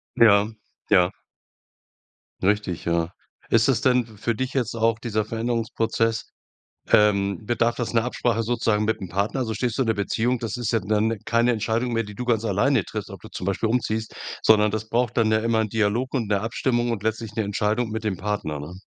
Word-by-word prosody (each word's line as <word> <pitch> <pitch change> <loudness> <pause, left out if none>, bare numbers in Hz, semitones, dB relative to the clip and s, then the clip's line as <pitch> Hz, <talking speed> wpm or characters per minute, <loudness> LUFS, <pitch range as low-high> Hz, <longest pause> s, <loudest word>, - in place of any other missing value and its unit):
Ja. 105 -2 +6 0.4
Ja. 90 -2 +5 1.3
Richtig, 100 -3 0
ja. 85 +1 0 0.4
Ist 115 +2 +4
es 135 - +2
denn 125 -1 +3
f 110 -3 -16
für 115 +2 0
dich 130 +3 -3
jetzt 125 -4 -1
auch 115 0 +1
dieser 110 -3 -1
Veränderungsprozess 115 0 -1 0.6
ähm, 100 -1 +3
bedarf 120 +1 +1
das 120 -1 -3
'ner 115 0 +3
Absprache 120 -2 0
sozusagen 110 -2 +1
mit 110 - +1
'm 95 -3 -6
Partner? 100 +8 -1
So, 110 - -3
stehst 120 +2 -2
du 130 - +3
in - - -4
der 110 - +3
Beziehung, 115 +4 0
das 115 +1 -3
ist 120 -1 -2
ja 115 - +2
dann 105 +2 +1
ne, 115 - -3
keine 120 +1 +3
Entscheidung 115 +2 -1
mehr, 115 - +1
die 105 -1 -10
du 125 - -5
ganz 115 -2 +1
alleine 110 +3 +2
triffst, - - -6
ob - - -9
du - - -10
zum - - -6
Beispiel 100 +3 0
umziehst, 110 -2 -1 0.3
sondern 105 -1 +5
das 110 0 -4
braucht 120 0 0
dann 110 -1 +3
ja 110 - +4
immer 115 0 +1
'n 110 - +1
Dialog 110 +4 0
und 120 -6 -1
'ne 100 -2 +1
Abstimmung 120 +1 0
und 105 -4 -3
letztlich 110 -1 -2
'ne 110 - 0
Entscheidung 105 +3 0
mit 110 0 -4
dem 105 -4 -1
Partner, 95 -7 -3
ne? 85 +6 -8
110 Hz, 210 wpm, -24 LUFS, 105-120 Hz, 1.3 s, Ja